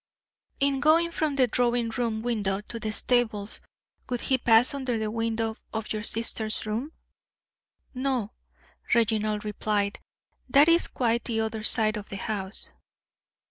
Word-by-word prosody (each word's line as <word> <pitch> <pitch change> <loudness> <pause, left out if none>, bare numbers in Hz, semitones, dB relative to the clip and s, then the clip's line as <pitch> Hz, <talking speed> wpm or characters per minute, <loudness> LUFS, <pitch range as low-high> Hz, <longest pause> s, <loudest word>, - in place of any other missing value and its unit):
"In 275 -1 +2
going 325 +4 +4
from 310 -3 -1
the 265 -2 +4
drawing 240 -1 +1
room 225 -1 -2
window 205 -5 0
to 230 +2 -8
the 215 0 -3
stables, 220 -3 +1 0.5
would 245 -1 -2
he 260 -1 +1
pass 235 +2 +4
under 260 -4 -2
the 215 -1 -2
window 225 0 -1 0.2
of 220 -1 -3
your 215 - -3
sister's 220 -1 0
room?" 235 +9 -3 1.0
"No," 255 -5 -1 0.6
Reginald 215 -2 +1
replied. 205 -1 -1 0.5
"That 280 +4 +6
is 335 +1 +4
quite 235 -2 0
the 225 -2 -1
other 220 0 -3
side 215 -1 +2
of 210 - -8
the 195 - -6
house." 195 -1 -4
225 Hz, 140 wpm, -26 LUFS, 215-250 Hz, 1.0 s, That